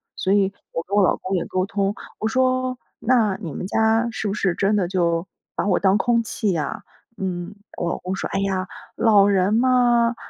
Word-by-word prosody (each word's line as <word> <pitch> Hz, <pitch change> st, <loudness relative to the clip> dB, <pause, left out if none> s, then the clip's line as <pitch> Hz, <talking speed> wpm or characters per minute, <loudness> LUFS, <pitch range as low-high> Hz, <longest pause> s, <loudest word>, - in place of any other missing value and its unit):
所 190 Hz, -, -1 dB
以 200 Hz, -1 st, +3 dB, 0.2 s
我 -, -, -2 dB
跟 200 Hz, -, -2 dB
我 205 Hz, -, +5 dB
老 -, -, +3 dB
公 190 Hz, +1 st, -3 dB
也 175 Hz, -, 0 dB
沟 185 Hz, 0 st, -1 dB
通， 200 Hz, 0 st, -1 dB, 0.3 s
我 220 Hz, -, 0 dB
说： 255 Hz, +1 st, +1 dB, 0.2 s
“那 225 Hz, -5 st, +2 dB
你 165 Hz, -7 st, -5 dB
们 185 Hz, -, -5 dB
家 225 Hz, +3 st, +2 dB
是 220 Hz, -2 st, -3 dB
不 -, -, -1 dB
是 195 Hz, -4 st, 0 dB
真 205 Hz, +2 st, +1 dB
的 185 Hz, -4 st, +1 dB
就 170 Hz, -1 st, 0 dB, 0.3 s
把 -, -, 0 dB
我 185 Hz, -, +3 dB
当 195 Hz, +1 st, +3 dB
空 235 Hz, 0 st, +2 dB
气 210 Hz, -3 st, -1 dB
呀？” 155 Hz, -3 st, -3 dB, 0.4 s
嗯， 180 Hz, -1 st, -3 dB, 0.2 s
我 175 Hz, -, -1 dB
老 -, -, -2 dB
公 185 Hz, +1 st, -4 dB
说： -, -, -4 dB
“哎 -, -, -1 dB
呀， 190 Hz, -1 st, -1 dB, 0.3 s
老 205 Hz, -3 st, +5 dB
人 195 Hz, 0 st, +2 dB
嘛， 240 Hz, -1 st, +3 dB
200 Hz, 220 characters per minute, -22 LUFS, 185-225 Hz, 0.4 s, 我